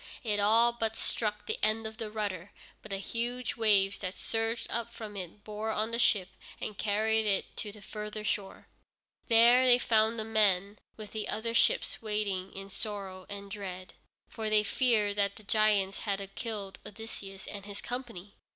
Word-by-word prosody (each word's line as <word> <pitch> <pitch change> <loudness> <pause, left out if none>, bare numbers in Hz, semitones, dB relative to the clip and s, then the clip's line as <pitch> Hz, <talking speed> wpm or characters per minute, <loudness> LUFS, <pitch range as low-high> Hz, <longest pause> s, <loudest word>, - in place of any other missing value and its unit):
It 210 -3 +1
all 225 +4 +6
but 225 -2 -1
struck 210 -2 -1
the - - -2
end 215 +1 +2
of 220 0 -5
the 225 -3 -4
rudder, 205 -4 -3 0.3
but 215 - -11
the 195 - -1
huge 240 +4 -3
waves 205 -3 +3
that 185 -1 -4
surged 225 +1 -1
up 235 0 -2
from 215 -3 -8
it 195 +2 -7
bore 215 +1 -4
on 220 +1 0
the 230 - -1
ship, 195 -6 +3 0.3
and 215 - -4
carried 220 +2 +2
it 200 -2 0
to 210 - -3
the 205 -1 -10
further 210 +1 -5
shore. 200 -2 -2 0.6
There 235 +2 +7
they 245 -1 +8
found 225 -1 +3
the 220 - -1
men 205 -2 +2 0.2
with 215 -2 -8
the 215 -1 -3
other 230 +1 -1
ships - - +3
waiting 205 -4 -1
in 195 0 -8
sorrow 195 -3 -6
and 200 -1 -7
dread, 185 -3 -6 0.3
for 220 -1 -3
they 215 0 +4
feared 210 -3 +2
that 200 -1 +2
the 215 - -13
giants 205 -2 +2
had 195 -2 -3
killed 210 -4 -5
Odysseus 205 -2 -8
and 200 -1 -7
his 205 -1 -6
company. 230 -6 -5
210 Hz, 180 wpm, -31 LUFS, 200-225 Hz, 0.6 s, they